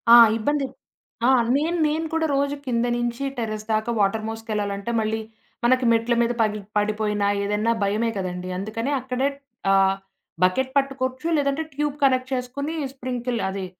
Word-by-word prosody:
ఆ! - - +11 0.2
ఇబ్బంది 290 +5 0 0.6
ఆ! - - +6 0.3
నేను 330 +4 0
నేను 315 +2 -1
కూడా 325 0 +1
రోజు 280 +1 +1
కింద 240 -2 +1
నుంచి 240 +2 -2
టెర్రస్ 215 -2 -3
దాకా 215 +2 0
వాటర్ 210 +2 +1
మోసుకెళ్ళాలంటే 215 -1 -3
మళ్ళీ, 220 0 -1 0.4
మనకి 255 +1 +4
మెట్ల 230 +1 +2
మీద 235 0 +2
పగిలి 215 -1 0
పడిపోయినా 210 -1 +1 0.2
ఏదన్నా 210 +3 +1
భయమే 215 +3 +1
కదండీ! 180 -1 -4
అందుకనే 220 +7 -3
అక్కడే 260 +1 0 0.4
ఆహ్, 195 0 +4 0.5
బకెట్ 260 +9 +2
పట్టుకోవచ్చు 270 +1 -1
లేదంటే, 280 +2 +1
ట్యూబ్ 295 0 -1
కనెక్ట్ 260 -1 +3
చేసుకొని 265 +5 -3 0.2
స్ప్రింకిల్ 250 -2 -3
అది 190 0 -4
235 Hz, 145 wpm, -24 LUFS, 210-265 Hz, 0.6 s, ఆ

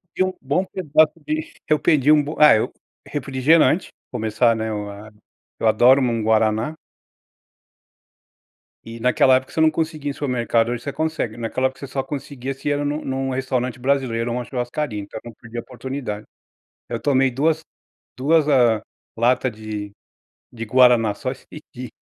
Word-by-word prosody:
Pedi - - +2
um 185 0 -1
bom 145 +7 0
pedaço 155 -4 +2
de 155 +1 -3 0.2
eu 155 - +3
que - - -29
pedi 150 -3 +4
um 150 -1 +5
bom 150 +2 -5
ah, 150 -4 +8
eu 110 - 0 0.4
refrigerante, 145 +5 +2 0.2
começar, 110 +2 +1
né, 110 0 -3
eu 105 -1 -4
a 105 +2 -11 0.5
eu 115 - +1
adoro 125 +5 +5
n 125 - +2
um 115 -1 -1
guaraná. 110 +5 +1 2.1
E, 115 +1 -9
naquela 125 +2 +4
época, 130 - -7
você 160 - 0
não 160 0 +5
conseguia 155 -2 -2
em - - -6
supermercado, 120 -4 0
hoje 120 -1 -4
você 140 - -3
consegue. 155 -8 -2
Naquela 120 +3 0
época 130 0 -11
você 140 - -7
só 135 0 -3
conseguia 135 -1 -5
se 135 +2 -4
era 145 0 0
num 145 +1 -2
num 135 0 -2
restaurante 130 -1 -2
brasileiro, 125 -3 0
ou 120 - -2
uma 125 - -3
churrascaria, 120 -1 -3
então 100 - -8
eu 120 - -9
não - - -12
perdia 120 0 -7
a - - -18
oportunidade. 125 -4 -6 0.6
Eu - - -3
tomei 135 -2 +2
duas 155 +5 +1 0.6
duas 150 +4 +2
ah, 120 -6 +4 0.4
lata 125 +2 +2
de 105 -2 -6 0.6
de 115 -1 -6
guaraná, 120 -2 +4
só 130 - -4
esse 135 - -10 0.3
dia. 125 0 -7
130 Hz, 175 wpm, -21 LUFS, 115-145 Hz, 2.1 s, ah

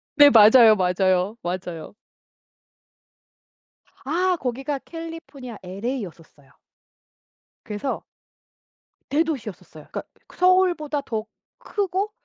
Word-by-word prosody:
네. 290 -1 +8
맞아요, 220 -1 +8
맞아요, 185 +2 +1
맞아요. 175 -2 -5 2.1
아 355 +6 +1
거기가 270 +3 -3
캘리포니아 325 -7 -9
엘에이였었어요. 185 - -7 1.1
그래서 225 +5 -4 1.0
대도시였었어요. 225 - -3
그러니까 - - -4 0.3
서울보다 360 -5 +2
더 220 -5 -4 0.3
크고 400 0 -2
250 Hz, 230 characters per minute, -23 LUFS, -, 2.1 s, 네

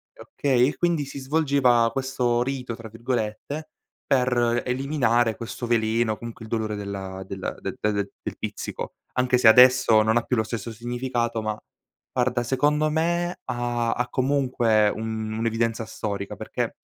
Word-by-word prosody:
okay; 135 - +1
quindi 170 -4 +1
si 140 - -8
svolgeva 135 -5 +3
questo 125 -3 0
"rito", 125 -3 -4
tra 115 -1 -10
virgolette, 120 +6 -3 0.4
per 120 -2 +2
eliminare 125 -4 +1
questo 120 +1 -6
veleno, 115 -1 +1
comunque 115 -1 -9
il - - -13
dolore 110 -2 -1
della 95 -2 -5
della 95 -1 -4
de - - -5
del 100 -2 0
del - - -6
pizzico, - - -5 0.2
anche 125 0 +2
se 120 - +5
adesso 125 -1 +7
non 110 +1 +2
ha 120 - +4
più 125 - -1
lo 110 - +2
stesso 115 0 -5
significato, 120 0 -2
ma 110 0 -3 0.5
guarda 125 -1 +1
secondo 145 +5 +1
me 170 +3 0
ha 120 -1 -1
ha 125 +1 -1
comunque 125 -6 +2
un 110 0 -4
un'evidenza 115 0 0
storica 100 -2 -4
perché - - -4
120 Hz, 145 wpm, -25 LUFS, 110-130 Hz, 0.5 s, adesso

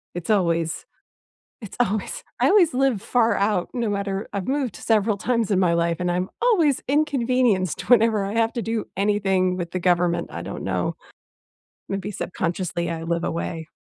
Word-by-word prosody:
It's 175 +2 -6
always 170 -5 +1 0.8
it's 210 - -9
always 215 -3 -1 0.2
I - - +4
always 380 -5 +5
live 260 -6 +2
far 230 -1 +2
out 200 -3 0
no 240 -4 -1
matter 200 0 -2
I've 195 -2 -3
moved 270 -5 -1
several 215 -2 +1
times 230 0 0
in 190 - +3
my 180 -3 +3
life, 170 0 +1
and 180 0 0
I'm 180 +1 -1
always 350 - +3
inconvenienced 255 - +1
whenever 225 -4 +4
I 200 - -4
have 225 0 +1
to 235 - -2
do 225 -1 -2
anything 195 -2 +1
with 175 -1 -4
the 185 - -2
government. 175 -1 +1
I - - -5
don't - - -6
know. - - -1 0.9
Maybe 195 +1 -3
subconsciously, 175 -2 -3
I 165 -1 -4
live 170 +1 -1
away. 165 -1 -4
200 Hz, 170 wpm, -23 LUFS, 180-230 Hz, 0.9 s, always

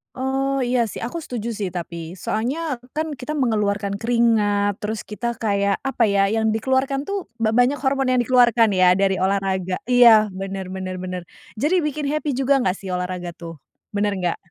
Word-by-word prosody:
Oh, 270 +1 -1
iya 245 -1 +1
sih, 215 - -7
aku 245 +9 -4
setuju 235 -2 -4
sih, 200 -3 -2
tapi 170 -1 -6
soalnya 255 - -2 0.2
kan 310 -2 -3
kita 300 +5 -4
mengeluarkan 205 -7 0
keringat, 210 -3 +2
terus 215 +1 -4
kita 235 +3 -4
kayak 200 -2 +1
apa 270 -3 0
ya, 200 -1 +2
yang 220 0 +1
dikeluarkan 265 +4 0
tuh, 395 +4 -4 0.2
ba 220 - +3
banyak 245 +4 +2
hormon 265 -1 +1
yang 250 - +3
dikeluarkan 240 -2 +4
ya, 180 0 +6
dari 195 0 +1
olahraga. 190 -1 -1
Iya, 230 -4 +7
bener 195 0 -6
bener 185 0 -5
bener. 185 -1 -4 0.4
Jadi 330 +9 +2
bikin 300 -1 -2
happy 305 -1 -2
juga 270 0 +2
nggak 185 -5 0
sih, 190 -2 -6
olahraga 180 -1 -4
tuh, 165 -1 -9 0.3
bener 205 0 0
nggak? 175 -1 -1
220 Hz, 175 wpm, -22 LUFS, 195-260 Hz, 0.4 s, Iya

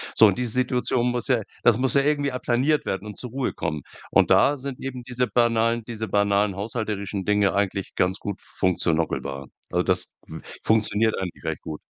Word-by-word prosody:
So 110 - +8
und 100 +1 +3
diese 125 -2 0
Situation 125 -1 +1
muss 120 -1 -2
ja 120 -5 +2 0.2
das 120 -2 +5
muss 130 0 +2
ja 140 - +5
irgendwie 145 -1 +1
applaniert 130 +4 +1
werden 95 +2 -2
und 105 - -8
zur 125 - -6
Ruhe 130 +2 -2
kommen. 75 -1 -3 0.3
Und - - +3
da 145 - +5
sind 135 -1 -6
eben 130 -2 -5
diese 125 0 -1
banalen 115 +1 +2
diese 110 -1 -4
banalen 100 0 +2
haushalterischen 105 -2 -3
Dinge 105 -1 +2
eigentlich 100 -1 -1
ganz 95 +1 +1
gut 100 -1 -6 0.2
einsetzbar. 80 -6 0 0.3
Also - - +1
das - - +2
f 80 - -8 0.2
funktioniert 110 0 +2
eigentlich 95 -2 -6
recht - - -3
gut. 75 -1 -7
110 Hz, 185 wpm, -24 LUFS, 100-125 Hz, 0.3 s, So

